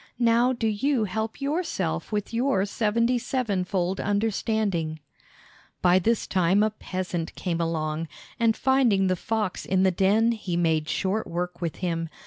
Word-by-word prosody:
Now 235 +1 +3
do 240 -3 -2
you 225 +4 +1
help 220 +2 -3
yourself 280 - -2
with 210 +1 -2
your 235 -5 +1
seventy 230 +4 +1
sevenfold 195 -7 -1
understanding." 200 -5 0 0.8
By 180 +1 +5
this 230 +5 +1
time 190 +2 +2
a 215 - +1
peasant 185 -5 -4
came 170 -2 -2
along, 160 -1 -2 0.3
and 230 -1 +3
finding 255 -8 +3
the 185 -1 +2
fox 215 +1 -2
in 190 0 +1
the 190 - +4
den 205 +6 +3
he 195 -6 -3
made 160 -3 +1
short 195 +6 -1
work 175 +1 -4
with 170 -2 -2
him. 165 -2 -2
200 Hz, 145 wpm, -26 LUFS, 175-230 Hz, 0.8 s, By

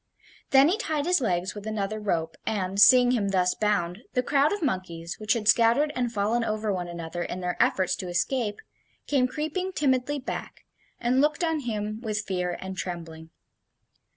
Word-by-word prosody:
Then 270 +1 +6
he 380 +7 +1
tied 310 -9 -1
his 360 -3 +2
legs 185 -4 -1
with 205 0 -8
another 215 0 -2
rope, 165 -6 -2
and, 195 -2 -1
seeing 250 0 +7
him 210 -5 +1
thus 180 -2 +2
bound, 195 -4 0
the 250 - +1
crowd 280 +2 +3
of 410 -4 -2
monkeys, 175 - -3
which 215 -1 +1
had 220 -3 -3
scattered 235 +7 +4
and 245 -2 -1
fallen 220 +2 0
over 215 -1 -1
one 180 -2 -3
another 170 0 -6
in 175 +1 -4
their 180 -1 -2
efforts 185 -2 +2
to 185 - -6
escape, 205 +5 -1 0.4
came 265 -3 +2
creeping 315 +7 -3
timidly 275 -1 +1
back, 275 - -6 0.3
and 250 +3 +2
looked 300 +3 +1
on 325 -2 +1
him 215 -4 -4
with 215 -2 -3
fear 180 -2 -2
and 190 0 -7
trembling. 165 -3 -6
215 Hz, 180 wpm, -26 LUFS, 185-260 Hz, 0.4 s, seeing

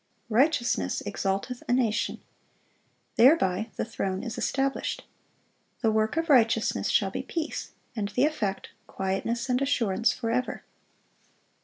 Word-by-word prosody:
"Righteousness 245 +1 +2
exalteth 205 +4 -2
a - - +3
nation." 235 -4 0 1.0
Thereby 225 - +4
"the - - -2
throne 195 -3 -3
is 235 -3 -4
established."(412) 270 0 -4
"The 225 - +4
work 220 +5 +1
of 325 0 0
righteousness 230 -6 +3
shall - - +2
be - - -3
peace;" 330 -2 -4 0.3
and 210 -3 -1
the 250 +7 +2
effect 215 -11 -2 0.2
"quietness 195 +6 -2
and 250 0 +1
assurance 230 -6 +2
forever." 240 +2 -2
230 Hz, 120 wpm, -27 LUFS, 210-260 Hz, 1.0 s, Thereby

